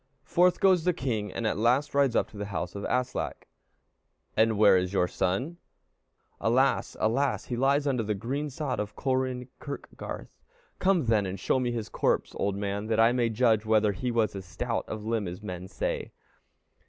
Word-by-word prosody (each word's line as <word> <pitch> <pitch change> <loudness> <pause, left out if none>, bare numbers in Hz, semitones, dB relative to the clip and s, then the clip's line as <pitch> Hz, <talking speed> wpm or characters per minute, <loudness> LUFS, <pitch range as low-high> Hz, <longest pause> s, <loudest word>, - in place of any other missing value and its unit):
Forth 180 +1 +3
goes 185 -4 +4
the 180 +1 +2
king, 110 - -2
and 115 - -4
at 110 - 0
last 125 +6 +2
rides 140 -4 +3
up - - +2
to 105 - -12
the 100 0 -4
house 90 -3 -4
of 100 - -6
Aslak. 125 0 -2 0.9
"And 110 -1 +3
where 105 -2 +7
is 90 +1 0
your 95 - +3
youngest 90 - -4
son?" 100 - 0 0.8
"Alas! 130 +4 +2
alas! 130 +5 +1
he 125 - -3
lies 140 +4 +2
under 130 -4 +1
the 105 -1 -1
green 135 +9 -3
sod 135 -2 -3
of 105 0 -4
Kolrin 130 -2 -1
kirkgarth." 140 -1 -8 0.4
"Come, 185 -6 +3
then, 110 -4 +2
and 95 +1 -5
show 130 - +1
me 125 -1 0
his 115 -3 -3
corpse, - - 0
old 100 -1 0
man, 100 +1 -3
that 110 0 +1
I 115 +1 +6
may 120 -2 +1
judge 110 -1 +3
whether 110 -1 +3
he 100 +6 -3
was 115 -4 +1
as 95 - -5
stout 115 +6 -3
of 110 -1 -5
limb 110 -3 -1
as 90 +4 -7
men 90 -2 -6
say." 95 - -3
115 Hz, 190 wpm, -28 LUFS, 105-130 Hz, 0.9 s, where